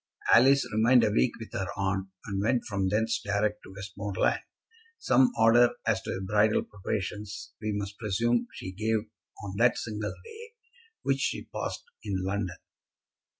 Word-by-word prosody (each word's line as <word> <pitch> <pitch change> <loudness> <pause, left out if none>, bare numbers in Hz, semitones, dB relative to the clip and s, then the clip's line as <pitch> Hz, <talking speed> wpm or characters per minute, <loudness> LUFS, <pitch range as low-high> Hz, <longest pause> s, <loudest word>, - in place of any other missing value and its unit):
Alice 135 +4 +6
remained 115 +3 +5
a 105 - +3
week 120 +3 +2
with 115 - -9
her 95 - -2
aunt, 95 0 -1 0.2
and 100 -1 -2
went 115 +3 +1
from 100 -2 -1
thence 110 +3 +1
direct 105 +1 0
to - - -13
Westmoreland. 100 0 -1 0.6
Some 130 - +4
order 115 +2 +5
as 105 -4 +1
to 95 0 -4
bridal 105 +2 +3
preparations 105 +1 -5
we 110 -1 -1
must 100 -1 -4
presume 115 +3 +1
she 95 - -7
gave 110 +3 0 0.4
on 100 -1 -6
that 120 +2 +4
single 105 -2 -4
day 460 +1 -11 0.5
which - - +1
she - - -1
passed - - -4 0.2
in 100 - -2
London. 95 -2 -2
105 Hz, 150 wpm, -28 LUFS, 100-115 Hz, 0.6 s, Alice